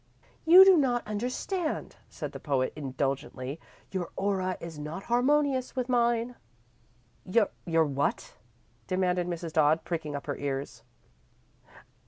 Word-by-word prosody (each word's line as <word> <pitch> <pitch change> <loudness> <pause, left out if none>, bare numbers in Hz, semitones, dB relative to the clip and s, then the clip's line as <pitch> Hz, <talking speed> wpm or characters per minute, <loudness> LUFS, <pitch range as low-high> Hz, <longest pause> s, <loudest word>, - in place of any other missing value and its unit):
"You 365 +3 +10
do 380 -2 +7
not 245 -5 +1
understand," 255 - -3
said - - -6
the - - -8
poet, 135 -4 -1
indulgently. 135 0 -3 0.3
"Your 185 -3 -3
aura 190 -2 -1
is 165 -3 -8
not 155 +6 -6
harmonious 260 +2 +1
with 255 -1 -2
mine." 240 0 +1 0.9
"Your 185 -5 +1
what?" 140 -1 -2 0.5
demanded 180 -1 0
Mrs. 170 -2 -5
Dodd, 155 +1 +3
pricking 165 -4 -4
up 140 - -6
her 145 - -3
ears. 140 0 -4
180 Hz, 120 wpm, -28 LUFS, 150-245 Hz, 0.9 s, You